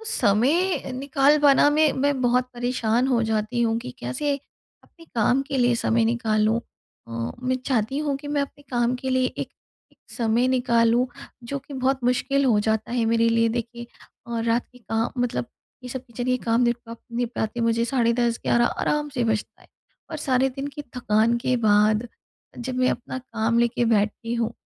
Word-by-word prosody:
समय 270 - +3
अ, - - -7
निकाल 275 +3 +2
पाना 290 0 +5
में, 300 0 +3
मैं 280 0 0
बहुत 250 0 +2
परेशान 245 0 0
हो 245 -3 +2
जाती 220 +2 -1
हूँ 225 -1 +1
कि 125 - -7
कैसे, 280 - -1 0.5
अपने 330 - -19
काम 245 +4 +3
के 275 -4 -2
लिए 245 -1 +3
समय 230 0 +1
निकालूँ 225 -1 +1 0.5
अ, 115 0 -4
मैं 255 +1 +1
चाहती 250 0 0
हूँ 295 -2 -1
कि 290 +1 -10
मैं 290 0 0
अपने 280 +1 -7
काम 240 0 +1
के 260 +1 -4
लिए 260 0 +2
एक - - -4 0.4
एक - - -29
समय 235 +1 +1
निकालूँ। 245 -1 +2 0.4
जो 280 - -2
कि 280 +1 -12
बहुत 265 0 0
मुश्किल 275 +3 +1
हो 225 -5 +4
जाता 220 +1 -1
है 240 -1 +1
मेरे 230 0 +3
लिए 230 0 +3
देखिए 235 +1 -4 0.4
और 230 -1 -2
रात 230 +1 +1
के - - -15
का 225 0 -2
मतलब 235 - -1 0.4
ये 250 - -7
सब 260 +1 -6
किचन 245 0 -6
के 255 0 +2
काम 230 +1 +2
निपटाते 235 -1 -3
निपटाते 235 -1 -2
मुझे, 230 0 +2
साढ़े 235 -2 +1
10 235 -1 0
11 240 0 +3
आराम 295 +4 -1
से 245 - +1
बजता 220 -2 -2
है - - -21 0.4
और 315 - -4
सारे 265 -2 +1
दिन 270 +2 -5
की 285 +1 -7 0.2
थकान 225 0 +2
के 250 +1 0
बाद, 215 +1 +3 0.5
जब 255 +1 -4
मैं 255 0 +3
अपना 245 +2 -5
काम 230 -2 -1
लेके 235 0 +1
बैठती 225 +1 0
हूँ। 230 -1 -1
240 Hz, 185 wpm, -24 LUFS, 230-260 Hz, 0.5 s, पाना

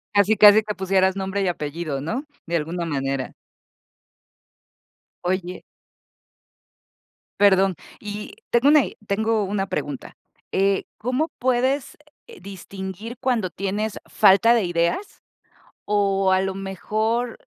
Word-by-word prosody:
Casi, 205 +2 +4
casi 210 +1 +8
te 210 -1 -5
pusieras 190 0 +2
nombre 195 +1 -2
y 195 - 0
apellido, 155 -3 -3
¿no?, 225 - -4 0.2
de 170 - -2
alguna 170 +2 -3
manera. 135 -4 -2 1.9
Oye. 180 0 -2 1.8
Perdón. 195 -2 +4 0.2
Y 210 - -7 0.2
tengo 240 +4 +4
i 275 - -2
tengo 220 +2 +1
una 195 0 -2
pregunta, 145 -7 -5 0.4
eh, 195 0 +1
¿cómo 255 +8 -1
puedes, 260 +2 0 0.3
eh, 465 -3 -13
distinguir 195 +3 -8
cuando 235 -8 0
tienes 200 +4 -3
falta 215 +5 +5
de 235 -3 +2
ideas 175 - -1 0.6
O 195 -2 +2
a 185 - +3
lo 190 0 -2
mejor 215 +5 -2
195 Hz, 115 wpm, -23 LUFS, 185-220 Hz, 1.9 s, casi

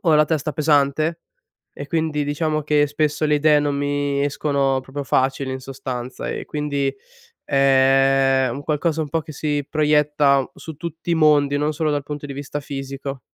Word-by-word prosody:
la 150 0 +5
testa 155 -1 -1
pesante, 155 +2 +1 0.5
e - - -7
quindi 160 -3 -1
diciamo 155 +1 -1
che 150 0 +2
spesso 150 +1 -1
le 150 0 +3
idee 150 0 +4
non 145 -1 -1
mi 145 0 -1
escono 140 -2 0
proprio 140 +2 -6
facili, 130 0 0
in 130 - -4
sostanza, 130 -1 -6
e - - -4
quindi 145 -2 -1 0.5
è 135 -1 +3
un 140 +3 -6
qualcosa 155 +2 0
un 150 - -4
po' 165 +1 0
che 155 - -10
si 145 -1 -2
proietta 150 -3 +2
su 160 - -9
tutti 170 +2 -5
i - - +3
mondi, 145 -2 +4
non 150 +1 +1
solo 155 0 0
dal 145 -1 0
punto 145 0 -6
di 140 - -6
vista 145 +1 -5
fisico. 135 -1 -6
145 Hz, 170 wpm, -21 LUFS, 135-150 Hz, 0.5 s, la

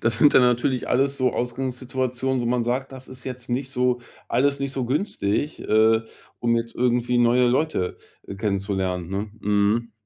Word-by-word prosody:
das 115 0 0
sind 145 - +5
dann - - +7
natürlich 125 +1 +1
alles 135 +2 +2
so 130 -2 +1
Ausgangssituationen, 130 +1 -2
wo 120 - -2
man 120 0 +1
sagt, 130 +3 -2
das 130 0 -10
ist 130 -1 -11
jetzt 125 -2 -7
nicht 130 +2 -2
so 125 -2 +1 0.3
alles 140 +2 +1
nicht 140 0 -2
so 130 -2 -2
günstig, 135 - -1
äh, 110 +1 +4 0.4
um 115 -1 +1
jetzt 115 0 -3
irgendwie 125 0 +1
neue 120 +1 +4
Leute 130 - 0 0.4
kennenzulernen, 95 -4 -1
ne? 100 +2 -3
Mhm. 105 +3 +1
125 Hz, 165 wpm, -24 LUFS, 115-130 Hz, 0.4 s, dann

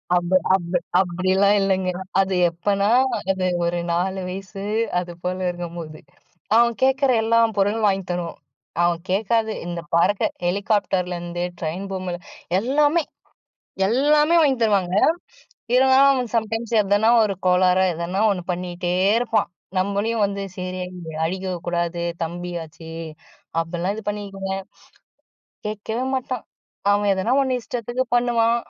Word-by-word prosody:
அந்த 175 +1 0 0.2
அந்த 175 -1 -3 0.2
அப்பிடியெல்லாம் 190 +3 +2
இல்லங்க. 190 -1 +1 0.3
அது 190 0 -1 0.2
எப்பன்னா, 200 +4 0 0.4
அது 190 -1 -1 0.2
ஒரு 175 0 0
4 190 +3 0
வயசு 195 +1 -7 0.4
அது 175 -1 -5
போல 180 +1 -1
இருக்கும்போது, 170 -3 -7 0.6
அவன் 235 0 +5
கேட்கிற 265 0 +3
எல்லா 230 +1 +3 0.2
பொருளும் 210 +2 +2
வாங்கித் 195 -2 -1
தருவோம். 175 -1 -4 0.4
அவன் 175 -1 +2
கேக்காதது 220 +3 +1
இந்த 175 -1 -4
பறக்க 180 +4 +3 0.2
ஹெலிகாப்டர்லேருந்து 180 -3 -1 0.2
ட்ரெயின் 170 +4 -3
பொம்ம 185 -2 -3 0.5
எல்லாமே! 295 +7 +2 0.8
எல்லாமே! 295 +7 +3
வாங்கித் 265 -6 +2
தருவாங்க. 195 -4 +2 0.8
இவுங்க 260 +1 +5 0.2
அவன் 250 -4 -1
சம்டைம்ஸ் 225 +1 -1
எதனா 205 +3 +2
ஒரு 200 -2 0
கோளாறா 180 +1 +4
எதனா 170 +4 -3
1 180 -3 -3
பண்ணீட்டே 175 0 -3 0.3
இருப்பான். 235 -5 +1 0.3
நம்மளையும் 200 +3 0
வந்து 200 0 -3 0.2
சரி 185 0 -4 0.5
அடிக்கக்கூடாது 175 -1 -2 0.2
தம்பியாச்சே! 165 -1 -6 0.7
அப்புட்லாம் 175 +3 -2
இது 220 - -7
பண்ணிக்குவேங்க. 195 -2 -4 1.1
கேக்கவே 220 +4 -3
மாட்டான். 255 -2 -3 0.5
அவன் 205 0 +3
எதனா 190 +6 0
1 260 -2 +1
இஷ்டத்துக்கு 240 +3 -3
பண்ணுவான். 235 -1 +3
195 Hz, 115 wpm, -22 LUFS, 175-225 Hz, 1.1 s, அவன்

